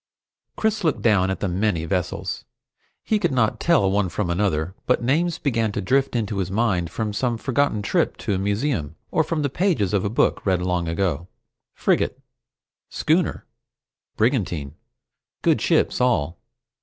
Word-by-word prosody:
Chris 220 Hz, -2 st, 0 dB
looked 160 Hz, -4 st, 0 dB
down 100 Hz, -5 st, +3 dB
at 95 Hz, -, -3 dB
the 100 Hz, -, 0 dB
many 90 Hz, -2 st, 0 dB
vessels. 90 Hz, -1 st, -2 dB, 0.6 s
He 215 Hz, -, +1 dB
could 175 Hz, -6 st, +1 dB
not 115 Hz, -4 st, +1 dB
tell 160 Hz, -, +3 dB
one 100 Hz, -2 st, +1 dB
from 90 Hz, -1 st, -2 dB
another, 85 Hz, -2 st, 0 dB
but 125 Hz, -1 st, +2 dB
names 165 Hz, +7 st, +1 dB
began 115 Hz, -6 st, 0 dB
to -, -, -2 dB
drift 135 Hz, +7 st, +1 dB
into 105 Hz, -3 st, -1 dB
his 95 Hz, -1 st, -1 dB
mind 95 Hz, -5 st, 0 dB
from 105 Hz, +3 st, -3 dB
some 120 Hz, +1 st, 0 dB
forgotten 130 Hz, -3 st, 0 dB
trip -, -, +1 dB
to -, -, -2 dB
a 95 Hz, -, 0 dB
museum, 100 Hz, -, -1 dB, 0.2 s
or 160 Hz, -, +3 dB
from 155 Hz, 0 st, -2 dB
the -, -, +2 dB
pages 150 Hz, -, +1 dB
of 100 Hz, -, +2 dB
a 100 Hz, -, 0 dB
book 115 Hz, -, +1 dB
read 95 Hz, -2 st, +2 dB
long 90 Hz, -2 st, 0 dB
ago. 85 Hz, -1 st, -1 dB, 0.5 s
Frigate, -, -, +1 dB, 0.7 s
schooner, 160 Hz, +2 st, 0 dB, 0.7 s
brigantine. 95 Hz, -, 0 dB, 0.7 s
Good -, -, +3 dB
ships -, -, +2 dB
all. 90 Hz, -10 st, +1 dB
105 Hz, 160 wpm, -23 LUFS, 90-130 Hz, 0.7 s, down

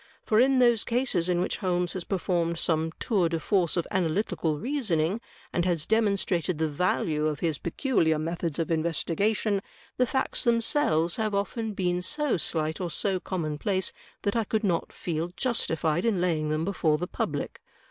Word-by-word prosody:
For 215 Hz, -, +3 dB
in 265 Hz, +2 st, +5 dB
those 240 Hz, -3 st, +4 dB
cases 230 Hz, -8 st, +1 dB
in 175 Hz, -1 st, +2 dB
which 185 Hz, -, -1 dB
Holmes 180 Hz, -2 st, 0 dB
has 185 Hz, -, -4 dB
performed 170 Hz, -3 st, -1 dB
some 160 Hz, -1 st, 0 dB
tour 195 Hz, -8 st, +2 dB
de 165 Hz, 0 st, -1 dB
force 180 Hz, 0 st, +1 dB
of 170 Hz, -, +1 dB
analytical 175 Hz, -3 st, 0 dB
reasoning, 210 Hz, -, 0 dB, 0.3 s
and 175 Hz, -, +1 dB
has 170 Hz, -4 st, +1 dB
demonstrated 200 Hz, -6 st, +1 dB
the 160 Hz, 0 st, +1 dB
value 155 Hz, -1 st, 0 dB
of 150 Hz, -2 st, -3 dB
his 160 Hz, -4 st, 0 dB
peculiar 170 Hz, -, +1 dB
methods 165 Hz, 0 st, -2 dB
of 165 Hz, -1 st, -1 dB
investigation, 195 Hz, +6 st, +1 dB, 0.4 s
the 250 Hz, -, +3 dB
facts 265 Hz, +2 st, -1 dB
themselves 230 Hz, -, +2 dB
have 215 Hz, -2 st, 0 dB
often 215 Hz, +2 st, -2 dB
been 180 Hz, -1 st, 0 dB
so 295 Hz, +6 st, +1 dB
slight 160 Hz, 0 st, -1 dB
or 175 Hz, -, -2 dB
so 190 Hz, +1 st, 0 dB
commonplace 180 Hz, +2 st, -2 dB, 0.3 s
that 200 Hz, -, 0 dB
I 230 Hz, -, +2 dB
could 220 Hz, +1 st, -1 dB
not 175 Hz, -5 st, 0 dB
feel 165 Hz, -1 st, -3 dB
justified 170 Hz, -7 st, 0 dB
in 225 Hz, -5 st, +1 dB
laying 160 Hz, -4 st, 0 dB
them 155 Hz, +1 st, 0 dB
before 165 Hz, -5 st, +1 dB
the 175 Hz, -, -2 dB
public. -, -, -3 dB
180 Hz, 170 wpm, -27 LUFS, 165-215 Hz, 0.4 s, in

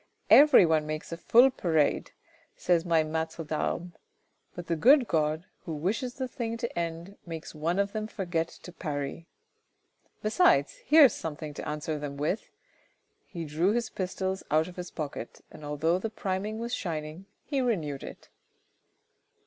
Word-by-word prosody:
" -, -, -40 dB
Every 295 Hz, -10 st, +7 dB
one 155 Hz, -2 st, +1 dB
makes 155 Hz, +1 st, -5 dB
a -, -, -2 dB
full 245 Hz, +9 st, +5 dB
parade, 160 Hz, -, +1 dB, 0.5 s
says 170 Hz, -1 st, +1 dB
my 165 Hz, -2 st, +3 dB
niatre 160 Hz, +1 st, -3 dB
tTarmes, 165 Hz, +3 st, -2 dB, 0.6 s
but 175 Hz, -, -6 dB
the 170 Hz, -, -1 dB
good 250 Hz, -, +5 dB
God, 155 Hz, +1 st, 0 dB, 0.2 s
who 160 Hz, -, -4 dB
wishes 225 Hz, -, -2 dB
the 260 Hz, -2 st, -3 dB
thing 235 Hz, -3 st, -4 dB
to 235 Hz, 0 st, -4 dB
end, 170 Hz, +3 st, -5 dB
makes 165 Hz, -2 st, -7 dB
one 165 Hz, +4 st, -1 dB
of 200 Hz, 0 st, +1 dB
them 215 Hz, 0 st, -3 dB
forget 175 Hz, -6 st, -2 dB
to 180 Hz, -, -12 dB
parry. 150 Hz, -1 st, -5 dB, 1.0 s
Besides, 360 Hz, -, +3 dB
here's 300 Hz, -4 st, +8 dB
something 155 Hz, -1 st, -6 dB
to -, -, -6 dB
answer 150 Hz, 0 st, -3 dB
them 145 Hz, -1 st, -5 dB
with." 155 Hz, +9 st, -2 dB, 0.8 s
He 170 Hz, -3 st, -6 dB
drew 165 Hz, +7 st, +1 dB
his 235 Hz, -1 st, -1 dB
pistols 190 Hz, 0 st, -3 dB
out 155 Hz, +1 st, +2 dB
of 180 Hz, -, -10 dB
his 180 Hz, -1 st, -6 dB
pocket, 145 Hz, -6 st, -6 dB
and 155 Hz, -, -12 dB
although 155 Hz, +4 st, 0 dB
the 225 Hz, -, -3 dB
priming 205 Hz, 0 st, -3 dB
was 235 Hz, +1 st, -4 dB
shining, 160 Hz, +1 st, -4 dB, 0.2 s
he 280 Hz, -3 st, -1 dB
renewed 160 Hz, -, -1 dB
it. -, -, -10 dB
170 Hz, 160 wpm, -28 LUFS, 155-215 Hz, 1.0 s, here's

